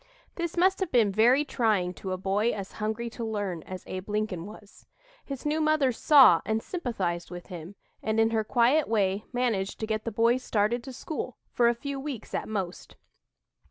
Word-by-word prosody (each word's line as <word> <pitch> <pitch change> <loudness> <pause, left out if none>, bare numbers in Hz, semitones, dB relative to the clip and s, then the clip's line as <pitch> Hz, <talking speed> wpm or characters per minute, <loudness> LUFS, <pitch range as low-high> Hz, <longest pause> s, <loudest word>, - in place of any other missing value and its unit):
This 340 -1 -4
must 375 +2 +3
have 380 -4 -2
been 225 -5 +4
very 240 +8 +4
trying 210 -9 +1
to 190 +1 -6
a 185 - -1
boy 195 +4 +1
as 195 -2 -6
hungry 220 +2 -2
to 235 - -6
learn 205 -6 -3
as 185 -1 -7
Abe 185 +2 -6
Lincoln 205 -4 -2
was. 210 -1 -14 0.4
His 275 -1 -7
new 305 +1 +1
mother 310 -4 +3
saw 255 - +6
and 220 0 -1
sympathized 195 - -3
with 175 0 -8
him, 175 +3 -8 0.3
and 220 0 0
in 225 0 +4
her 220 -1 +1
quiet 245 +7 +3
way, 205 -2 +1
managed 230 -6 -1
to 220 - -2
get 215 0 -2
the 230 - -3
boy 230 +3 +3
started 235 -1 0
to 265 - -7
school, 260 -1 -5
for 240 - +3
a 235 - +3
few 280 +3 -5
weeks 270 -5 -6
at - - -3
most. 190 -5 -4
220 Hz, 195 wpm, -28 LUFS, 195-255 Hz, 0.4 s, saw